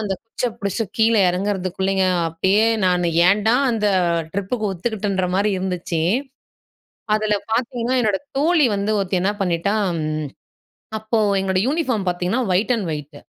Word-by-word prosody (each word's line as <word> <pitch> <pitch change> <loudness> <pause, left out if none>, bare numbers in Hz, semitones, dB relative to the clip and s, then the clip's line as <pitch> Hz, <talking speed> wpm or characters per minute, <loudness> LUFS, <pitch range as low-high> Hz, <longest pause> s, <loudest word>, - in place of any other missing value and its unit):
அந்த 205 -3 -2
குச்சிய 240 +2 -3
பிடிச்சு 200 +2 -2
கீழே 225 -1 +4
எறங்குறதுக்குள்ளேங்க, 190 0 -1 0.2
அப்பயே 190 +7 +2 0.2
நான் 180 -1 +2 0.2
ஏன்டா 210 +4 +3 0.2
அந்த 215 -3 +1 0.4
ட்ரிப்புக்கு 205 +2 -2
ஒத்துக்கிட்டன்ற 195 -1 -2
மாதிரி 200 +2 +2
இருந்துச்சு. 180 -3 -2 1.2
அதுல 215 -1 +1 0.2
பார்த்தீங்கன்னா, 245 +1 0
என்னோட 210 -4 +1 0.2
தோழி 310 -2 +4
வந்து 200 +2 -1
ஒருத்தி 190 -1 0
என்ன 195 +3 +1
பண்ணிட்டா 180 +3 0 1.2
அப்போ 220 +1 -1 0.2
எங்ளோட 190 -1 0
யூனிஃபார்ம் 260 - 0
பார்த்தீங்கன்னா 180 +7 -1
ஒயிட் 210 +7 +2
அண்ட் 205 -6 -3
ஒயிட் 150 -1 -7
200 Hz, 125 wpm, -21 LUFS, 185-225 Hz, 1.2 s, கீழே